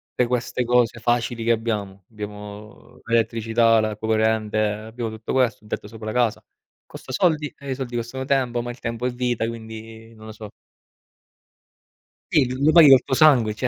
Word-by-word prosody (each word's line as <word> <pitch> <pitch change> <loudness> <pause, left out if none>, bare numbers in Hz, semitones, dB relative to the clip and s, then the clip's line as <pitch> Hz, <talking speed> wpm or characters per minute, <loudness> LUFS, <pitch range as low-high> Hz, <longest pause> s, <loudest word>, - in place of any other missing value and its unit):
te 125 - +2
queste 125 +1 -1
cose 120 -1 +2
facili 120 0 -1
che 115 - +2
abbiamo. 105 -4 -3
Abbiamo 105 +3 -10
l'elettricità, 115 0 +2
la 110 -1 -3
corrente, 110 -1 0
abbiamo 110 +2 -3
tutto 110 0 -6
questo, 125 -5 +1
un 105 - -17
tetto - - -5
sopra 110 0 -10
la 110 - -3
casa. 120 -3 0 0.4
Costa - - -11
soldi 155 -6 +1
e 140 -1 -7
i - - -1
soldi 125 -2 -6
costano 120 +3 -4
tempo, 130 -3 0
ma 120 - -6
il 120 - -12
tempo 115 +1 -4
è 125 - 0
vita, 120 -2 -1
quindi 115 0 -9
non 110 0 -13
lo 110 - -8
so. 105 -1 -10 1.8
Sì, 140 -4 +4 0.2
lo 155 - +5
paghi 165 -2 +8
col 135 -2 +7
tuo - - -4
sangue, 130 -7 +5
cioè, 125 +4 -2
115 Hz, 180 wpm, -22 LUFS, 110-125 Hz, 1.8 s, paghi